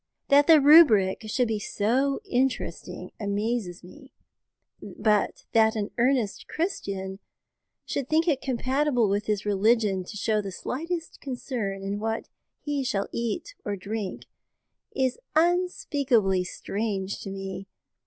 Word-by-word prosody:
That 285 0 +6
the 320 -2 +8
rubric 275 - +6
should 245 +3 +1
be 220 -1 -1
so 255 +8 0
interesting 260 +1 -2
amazes 205 -3 -2
me, 265 +10 -14 0.7
but 210 -2 0
that 220 -1 +4
an 210 -1 -2
earnest 245 -4 +1
Christian 195 - -3 0.7
should 275 -2 -3
think 320 +2 +2
it 285 -5 +2
compatible 260 -1 +1
with 205 +1 -1
his 210 -1 -1
religion 205 -1 +2
to 210 - -8
show 215 +1 +1
the 195 -1 -6
slightest 330 - -5
concern 240 -7 -4
in 200 +1 -3
what 225 +1 -3 0.3
he 290 -2 -2
shall 205 -6 -1
eat 235 - -3
or 205 - -2
drink 200 0 -5 0.7
is 260 -2 0 0.2
unspeakably 285 - +2
strange 200 0 -3
to - - -6
me. 195 0 -6
225 Hz, 125 wpm, -26 LUFS, 200-275 Hz, 0.7 s, the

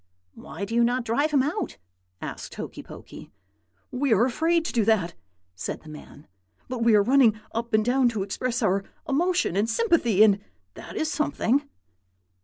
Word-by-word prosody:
"'Why 200 - -7
do 220 - -7
you 235 0 +4
not 245 +1 0
drive 280 +7 +1
him 285 -4 +3
out?' 330 +6 -3 0.5
asked - - -7
Hokey - - -7
Pokey. - - -12 0.6
"'We 265 -1 +1
are 220 +3 +4
afraid 325 +6 +1
to - - -3
do 230 - +2
that,' 200 -6 +1 0.4
said 90 - -5
the 155 - -12
man; 150 -1 -12 0.4
'but 255 -2 -4
we 230 -2 +5
are 205 - +5
running 240 -3 +4
up 230 +1 -3
and 215 0 +2
down 250 0 +3
to 215 -4 -2
express 235 +5 -2
our 195 -1 +1 0.2
emotion 340 - +1
and 210 +3 +1
sympathy, 240 - +3
and 205 -2 +4 0.3
that - - -10
is 315 - -1
something.' 285 -2 0
235 Hz, 175 wpm, -25 LUFS, 215-280 Hz, 0.6 s, we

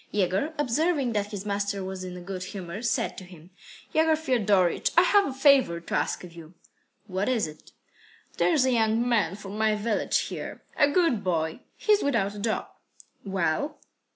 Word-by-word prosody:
Yegor, 205 - 0
observing 290 -1 +1
that 205 -1 0
his 205 -1 -6
master 200 -1 -2
was 190 0 -5
in 180 -1 -7
a - - -8
good 185 0 -5
humour, 185 0 -6
said 235 -1 -1
to - - -8
him: 180 -1 -15 0.4
"Yegor 320 0 +4
Fiodorych, 210 - +2
I 345 - +8
have 400 +2 +4
a - - -3
favour 265 - +4
to 170 - -9
ask - - 0
of 175 -2 -10
you." 165 0 -13 0.5
"What 195 +2 -2
is 240 -4 +1
it?" 155 0 -12 0.7
"There's 305 -7 +3
a 260 - +2
young 225 0 +2
man 210 -7 +1
from 200 +1 -8
my 220 -1 +3
village 210 +1 0
here, - - -6
a 290 - +4
good 285 - +2
boy. 160 -2 -1 0.2
He's 420 -1 +3
without 200 -8 0
a 210 - -8
job." 220 +1 -2 0.5
"Well?" 195 - -1
210 Hz, 180 wpm, -27 LUFS, 185-265 Hz, 0.7 s, I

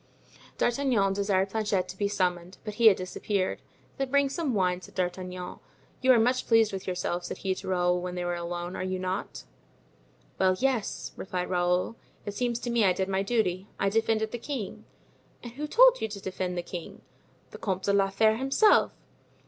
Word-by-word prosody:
D'Artagnan 240 -6 +2
desired 195 -1 +1
Planchet 205 -4 0
to 185 - -6
be 200 +1 0
summoned, 180 -2 -1
but 210 - -5
he 230 +1 +5
had 205 - +7
disappeared. 185 +1 -2 0.4
"Then 270 -1 -2
bring 280 0 +3
some 275 -3 -2
wine," 180 -2 +1
said - - -14
D'Artagnan. 180 0 -4 0.4
"You 260 0 +5
are 250 - +7
much 250 +3 +1
pleased 225 -3 +4
with 190 0 -5
yourself," 180 -1 -2
said - - -5
he 190 -1 -1
to - - -8
Raoul 180 -1 +1
when 180 0 -4
they 180 0 -3
were 175 - -1
alone, 175 +1 -4
"are - - -4
you 185 0 -2
not?" 185 0 -4 1.0
"Well, 185 0 +4
yes," 255 -4 -1
replied 180 -1 -4
Raoul. 180 +5 +1 0.3
"It 205 - -4
seems 240 +2 -1
to 240 - -3
me 235 -2 +3
I 190 -2 +4
did 190 +1 -2
my 190 0 +1
duty. 195 -3 0
I 195 - +2
defended 220 0 +1
the 240 - -4
king." 250 -5 -5 0.6
"And 240 - -7
who 290 +5 -5
told - - +6
you - - 0
to 205 -1 -7
defend 185 -1 -3
the 175 - -2
king?" 175 -1 -8 0.5
"The - - -10
Comte 190 -2 -2
de 200 - +1
la 195 -1 +3
Fere 220 +3 +3
himself." 270 - +4
195 Hz, 195 wpm, -28 LUFS, 185-230 Hz, 1.0 s, had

